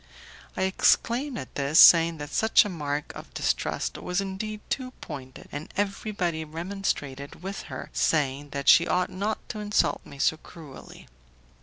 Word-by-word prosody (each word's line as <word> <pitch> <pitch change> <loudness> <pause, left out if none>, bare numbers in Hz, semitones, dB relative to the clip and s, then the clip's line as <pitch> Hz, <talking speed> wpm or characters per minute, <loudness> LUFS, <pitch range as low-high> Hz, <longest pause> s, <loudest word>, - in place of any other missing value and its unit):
I 190 - +1
exclaimed 240 +7 +2
at - - -8
this, 140 +3 +2
saying 165 -1 +8
that 145 0 -7
such 220 0 +4
a - - -3
mark 150 -4 -4
of - - -11
distrust - - -1
was 180 +1 -2
indeed 205 +2 -4
too 260 -2 -2
pointed, 135 -4 -9
and 145 +2 -7
everybody 195 -5 -2
remonstrated 160 -4 -4
with 195 +1 -5
her, - - -7
saying 145 -2 0
that 140 -1 -5
she 170 - +7
ought 180 0 0
not 205 +4 -3
to 215 - -5
insult 210 0 +1
me 140 - -13
so 155 +3 +2
cruelly. 155 -3 -13
170 Hz, 155 wpm, -26 LUFS, 145-200 Hz, -, saying